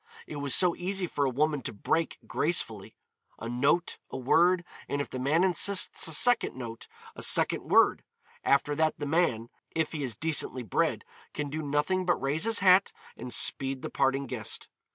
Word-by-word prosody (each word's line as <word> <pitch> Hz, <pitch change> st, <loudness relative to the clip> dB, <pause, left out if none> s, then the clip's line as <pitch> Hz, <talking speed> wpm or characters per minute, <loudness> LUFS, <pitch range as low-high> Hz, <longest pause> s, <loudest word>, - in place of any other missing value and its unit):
It 150 Hz, -, -8 dB
was 140 Hz, -2 st, +1 dB
so 180 Hz, -2 st, +3 dB
easy 190 Hz, +1 st, -2 dB
for 145 Hz, -4 st, -2 dB
a -, -, +1 dB
woman 150 Hz, +2 st, 0 dB
to -, -, -4 dB
break 160 Hz, +10 st, -2 dB
gracefully. 115 Hz, -, -2 dB, 0.4 s
A 115 Hz, -, -7 dB
note, 140 Hz, +8 st, 0 dB
a -, -, -6 dB
word, 175 Hz, +7 st, +2 dB, 0.2 s
and 140 Hz, -, -2 dB
if 145 Hz, -, -4 dB
the 130 Hz, -, -5 dB
man 150 Hz, +7 st, +1 dB
insists 190 Hz, 0 st, +3 dB
a -, -, -3 dB
second 245 Hz, +10 st, +2 dB
note, 115 Hz, -3 st, -8 dB, 0.3 s
a -, -, -9 dB
second -, -, +2 dB
word; -, -, +4 dB, 0.4 s
after 140 Hz, +1 st, +2 dB
that 155 Hz, +1 st, 0 dB
the 145 Hz, -, -5 dB
man, 140 Hz, -7 st, 0 dB, 0.2 s
if 160 Hz, -2 st, -2 dB
he 155 Hz, -, -5 dB
is 125 Hz, -4 st, -3 dB
decently 150 Hz, -5 st, -1 dB
bred, 110 Hz, -, -1 dB, 0.3 s
can 145 Hz, -2 st, -4 dB
do 155 Hz, +1 st, -4 dB
nothing 150 Hz, +6 st, -1 dB
but 175 Hz, -, +2 dB
raise 145 Hz, +7 st, 0 dB
his 225 Hz, 0 st, +2 dB
hat 185 Hz, +1 st, +5 dB, 0.2 s
and 125 Hz, -, -8 dB
speed 135 Hz, +1 st, +2 dB
the -, -, -5 dB
parting 135 Hz, 0 st, 0 dB
guest. -, -, -5 dB
150 Hz, 185 wpm, -28 LUFS, 135-175 Hz, 0.4 s, hat